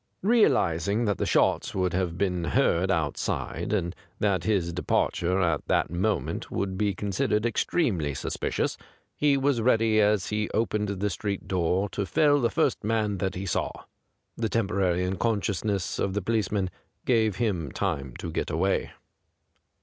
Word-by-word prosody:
Real 225 +2 +5
izing 95 +7 0
that 100 -3 0
the - - 0
shots - - +2
would 95 -2 0
have 90 -2 -1
been 90 -2 0
heard 85 +2 +2
outside, 80 -6 -1
and 85 +2 -1 0.2
that 95 -5 +1
his 90 -5 +1
de 90 - -3
parture 90 +2 +1
at 80 -4 0
that - - +1
moment 95 +5 -1
would 95 -1 -2
be 100 -1 0
considered 105 +2 0
extremely 105 - 0
suspicious, - - -2 0.4
he 145 -2 +3
was 135 -3 +1
ready 110 -2 +3
as 105 -2 +2
he 105 0 -1
opened 105 -2 0
the 100 +1 -1
street 100 -1 -4
door 90 +2 +1
to 100 0 -3
fell 145 +2 +3
the 115 - +2
first - - 0
man 105 -2 0
that 95 +1 -1
he 95 +2 -4
saw. 95 - 0 0.7
The 115 -1 -1
temporary 95 -5 +1
unconscious 100 +2 -1
ness 100 -4 -1
of 95 0 -1
the 105 - 0
policeman 100 -3 0 0.3
gave 110 -5 +2
him 95 - -1
time 70 -3 -2
to - - -5
get - - -2
away. 95 +5 0
100 Hz, 160 wpm, -27 LUFS, 90-110 Hz, 0.7 s, Real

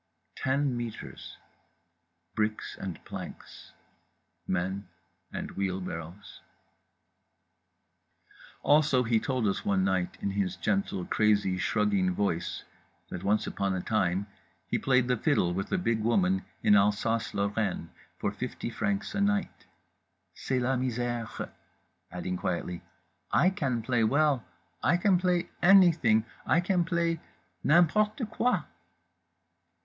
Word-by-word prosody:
Ten 135 0 0
metres. 120 -2 -7 1.0
Bricks 110 0 -2
and 95 -4 -7
planks. - - -9 0.8
Men 95 +2 -2 0.4
and - - -5
wheelbarrows…. 90 -1 -5 2.2
Also 145 -3 +4
he 115 -1 +2
told 130 -1 -1
us, 100 - 0
one 95 -2 +2
night, 95 -2 0
in 100 - -2
his 95 -2 -1
gentle, 95 0 -1
crazy, 105 -3 +2
shrugging 100 -1 +1
voice, 85 -4 -1 0.5
that 90 - -5
once 105 +1 +2
upon 100 -1 -1
a - - -1
time 95 -1 0 0.4
he - - -1
played 125 -2 +3
the 125 - +2
fiddle 110 - +1
with 95 +2 -3
a - - +2
big 115 -11 0
woman 95 -4 +2 0.2
in - - +5
Alsace 105 +2 +1
Lorraine 100 -4 -1 0.3
for - - -1
fifty - - -5
francs 200 - -2
a 200 - -1
night; 200 -1 0 0.7
"c'est 130 - -2
la 130 +2 +1
misère"—adding 120 -7 -5
quietly, 90 0 -3 0.5
"I 180 +6 +4
can 130 - -1
play 120 -1 +1
well, 140 +1 +3 0.4
I 175 - +3
can 185 0 +3
play 180 -1 0
anything, 170 - +6 0.2
I 160 - +3
can 175 -1 +1
play 170 -1 0 0.4
n'importe 210 - +3
quoi." 250 +2 +1
110 Hz, 115 wpm, -29 LUFS, 95-145 Hz, 2.2 s, anything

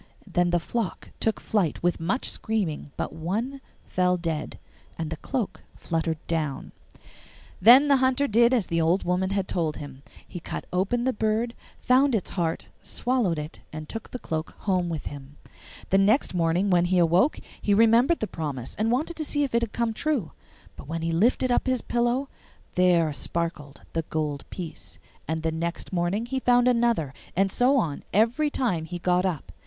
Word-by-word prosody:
Then 175 -1 +1
the 175 0 +2
flock 210 +1 -4
took 220 - 0
flight 185 -10 -1
with 175 0 +1
much 190 +11 -1
screaming, 185 -10 -2
but - - -3
one 215 - -3 0.2
fell 180 0 +1
dead, 165 -3 -3 0.4
and 160 -1 -4
the - - -2
cloak 220 - -3
fluttered 165 -1 -2
down. 155 -4 -2 0.9
Then 250 +8 +8
the 280 -1 +5
Hunter 260 +2 +2
did 235 +1 +4
as 240 -7 +2
the 165 0 0
old 170 +4 +2
woman 180 +1 0
had 195 -1 -1
told 160 -4 -1
him: 140 -2 -9 0.3
he 175 - -7
cut - - -6
open 200 +7 +1
the 260 +1 +1
bird, 220 +2 0 0.3
found 260 +1 +4
its 205 - -2
heart, 165 -3 -1 0.2
swallowed 240 -10 0
it, 150 +1 -6
and 155 0 -7
took 225 +5 -6
the - - -5
cloak 160 -8 -4
home 185 -3 +1
with 160 -3 -4
him. 140 0 -9 0.5
The 195 - +5
next 210 +6 +3
morning 175 +3 +1
when 175 -1 +4
he 180 +1 +2
awoke 175 - +4 0.2
he 205 - +2
remembered 230 +9 +4
the - - +1
promise, 145 - -5
and 215 +1 +1
wanted 300 +7 0
to 315 - -2
see 290 -1 0
if 275 - -2
it 235 - +3
had 230 -2 -2
come 235 -1 -1
true. 255 - -1 0.4
But - - -11
when 165 +1 -3
he 165 - 0
lifted 235 +8 +2
up 245 - +1
his 255 -2 +1
pillow, 240 +3 0 0.5
there 175 -4 +3
sparkled 150 -3 -3
the 165 - 0
gold 150 -3 -2
piece, 175 -4 -7 0.3
and 160 0 -2
the 160 - +1
next 170 +3 -4
morning 180 +6 0
he 265 +2 -2
found 245 -1 +4
another, 235 - +2 0.2
and 195 +1 +2
so 255 +6 +3
on 155 - -1
every 235 +9 +2
time 205 - -1
he 175 +2 -5
got 180 +1 +2
up. 165 -6 -4
185 Hz, 185 wpm, -26 LUFS, 165-240 Hz, 0.9 s, Then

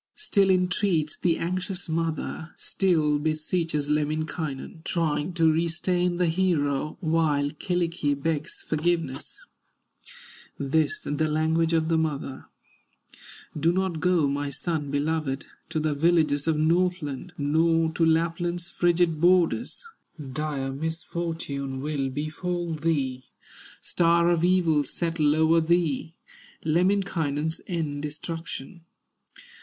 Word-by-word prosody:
Still 200 - +2
entreats 180 -4 +1
the 170 -2 +2
anxious 185 +2 -3
mother, 160 0 -3
Still 155 -6 +1
beseeches 155 0 -1
Lemminkainen, 155 0 -2
Trying 160 0 -1
to 165 -2 +4
restrain 175 +2 0
the 180 - +2
hero, 155 -5 0
While 155 -4 +1
Kyllikki 170 -3 -1
begs 155 0 -3
forgiveness; 155 -3 -1 1.2
This 145 +1 +1
the 145 +2 -1
language 160 +2 +1
of 160 -1 +2
the 165 -1 +2
mother: 145 -4 -3 1.1
"Do 160 +2 +2
not 185 -2 -1
go, 175 -3 +3
my 140 +1 -1
son 150 +1 -3
beloved, 145 -1 -1 0.2
To 155 - -1
the 155 -1 0
villages 150 -1 +2
of 160 -2 +2
Northland, 170 -1 0
Nor 160 +2 +2
to 165 - 0
Lapland's 170 +2 +1
frigid 175 -3 +2
borders; 180 - +2 0.5
Dire 140 -2 -2
misfortune 160 -3 -4
will 140 -1 -2
befall 165 +5 -3
thee, 140 -5 -1 0.6
Star 170 0 +3
of 170 -1 +1
evil 175 -5 +3
settle 155 0 0
o'er 160 +1 +4
thee, 165 -2 0 0.5
Lemminkainen's 160 -3 +1
end, 155 -5 -2
destruction. 165 +2 -6
160 Hz, 105 wpm, -26 LUFS, 150-175 Hz, 1.2 s, to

